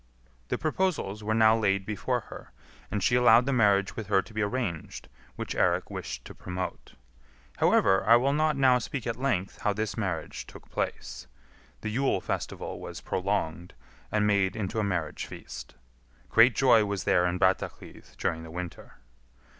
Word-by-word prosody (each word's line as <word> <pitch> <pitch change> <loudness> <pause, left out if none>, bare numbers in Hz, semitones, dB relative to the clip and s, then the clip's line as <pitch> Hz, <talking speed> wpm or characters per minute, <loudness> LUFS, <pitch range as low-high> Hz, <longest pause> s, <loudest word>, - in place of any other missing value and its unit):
The - - -1
proposals 155 - -1
were 110 +1 0
now 110 0 +6
laid 100 -3 +1
before 105 -1 -1
her, - - -11 0.4
and 105 -2 -2
she 120 - +2
allowed 120 -1 +6
the 135 - 0
marriage 100 -4 +3
with 110 -3 -5
her 95 -2 +3
to - - -15
be 110 - -2
arranged 105 -6 -3 0.3
which - - -4
Eirik - - +1
wished - - -6
to - - -9
promote. 90 0 -6 0.6
However, 95 0 +4
I 115 - +9
will 135 +4 +3
not 155 0 +1
now 130 -2 +5
speak 130 +1 -5
at 115 -1 -1
length 120 -8 -1
how 105 - +1
this 110 +1 -3
marriage 95 -7 -4
took - - -14
place; - - -4 0.5
the 110 - -3
Yule 135 +5 +1
festival - - -4
was - - -7
prolonged 90 -3 -2 0.4
and 105 -1 +2
made 100 -2 +2
into 110 0 -2
a - - +1
marriage 90 -6 -2
feast. - - -9 0.6
Great 115 +1 +6
joy 125 -5 +5
was 100 -3 -2
there 90 0 +3
in 90 +1 -1
Brattahlid 95 +1 -2
during 80 - -1
the 80 - -10
winter. 90 +1 -7
105 Hz, 170 wpm, -28 LUFS, 95-120 Hz, 0.6 s, I